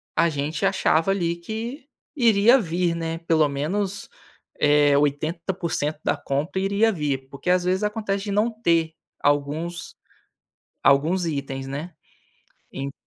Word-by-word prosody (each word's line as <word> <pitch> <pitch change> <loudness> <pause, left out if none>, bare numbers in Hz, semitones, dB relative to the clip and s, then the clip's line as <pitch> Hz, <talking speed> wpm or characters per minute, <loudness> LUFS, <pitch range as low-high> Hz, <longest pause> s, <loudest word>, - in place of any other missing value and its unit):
a 170 0 +3
gente 150 +5 -2
achava 190 -2 +2
ali 170 -3 0
que 225 - -6 0.3
iria 235 -1 +5
vir, 170 -1 0
né, 165 0 -3
pelo 160 -3 +2
menos, 185 +8 -2 0.5
eh, 145 -1 +5
80% 155 +1 -1
da - - +2
compra 150 +7 -2
iria 200 +3 +2
vir, 140 -5 -2
porque 140 +6 -5
às 180 0 +3
vezes 185 +3 +1
acontece 210 -2 -1
de 205 - -3
não 210 +4 +2
ter 165 -3 +2 0.3
alguns 150 +4 -1 0.9
alguns 165 +6 +3
itens, 135 -3 -4
né, 150 +6 -5 0.8
ent 135 +1 -4
170 Hz, 130 wpm, -24 LUFS, 145-195 Hz, 0.9 s, iria